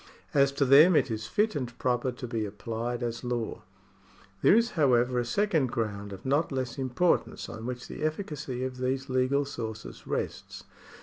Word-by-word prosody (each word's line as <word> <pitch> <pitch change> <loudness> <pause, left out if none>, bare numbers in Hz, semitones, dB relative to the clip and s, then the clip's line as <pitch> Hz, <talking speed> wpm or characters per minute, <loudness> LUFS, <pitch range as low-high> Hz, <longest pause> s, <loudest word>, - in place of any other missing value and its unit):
As 140 -1 +4
to 140 - +2
them, 150 +7 +7
it 135 - +3
is 110 -1 -3
fit 210 - +1
and 125 -4 -4
proper 125 0 0
to 125 0 -7
be 115 -2 -2
applied 115 +3 -4
as 120 0 -3
law. 120 -2 -3 0.8
There - - +6
is, 235 +1 +3
however, 125 -5 +3
a 120 - -1
second 160 - +1
ground 105 -4 -3
of 95 -1 -9
not 145 +5 +1
less 130 -1 -3
importance 135 +7 0
on 110 +2 -7
which 125 0 -5
the - - -8
efficacy 150 -5 -3
of 130 -1 -4
these 130 +2 -2
legal 130 +2 +2
sources 110 -6 -7
rests. - - -4
125 Hz, 175 wpm, -28 LUFS, 120-140 Hz, 0.8 s, them